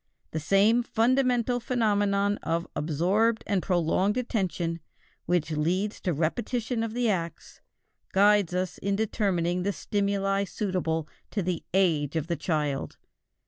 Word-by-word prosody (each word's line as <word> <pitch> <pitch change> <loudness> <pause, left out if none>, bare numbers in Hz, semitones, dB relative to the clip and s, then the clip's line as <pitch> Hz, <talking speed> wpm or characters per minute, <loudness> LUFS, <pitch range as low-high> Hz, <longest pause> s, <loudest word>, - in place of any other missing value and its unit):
The 160 - -2
same 200 +9 +4
fundamental 245 +1 +2
phenomenon 205 -4 +1
of 165 +1 -1
absorbed 185 +10 +1
and 200 -3 0
prolonged 185 +5 +1
attention 185 -8 -1 0.5
which 170 -2 +1
leads 180 +7 -1
to 180 - 0
repetition 225 - -1
of 225 0 -3
the 245 -1 +1
acts, 170 -5 -3 0.5
guides 200 -2 +4
us 185 -1 -2
in 200 0 0
determining 185 -5 0
the 200 +3 0
stimuli 200 -1 0
suitable 180 -6 -2 0.2
to 200 - -2
the 175 -2 -2
age 165 -6 +2
of 160 -2 0
the 170 0 -1
child. 150 -3 -2
195 Hz, 130 wpm, -27 LUFS, 170-215 Hz, 0.5 s, same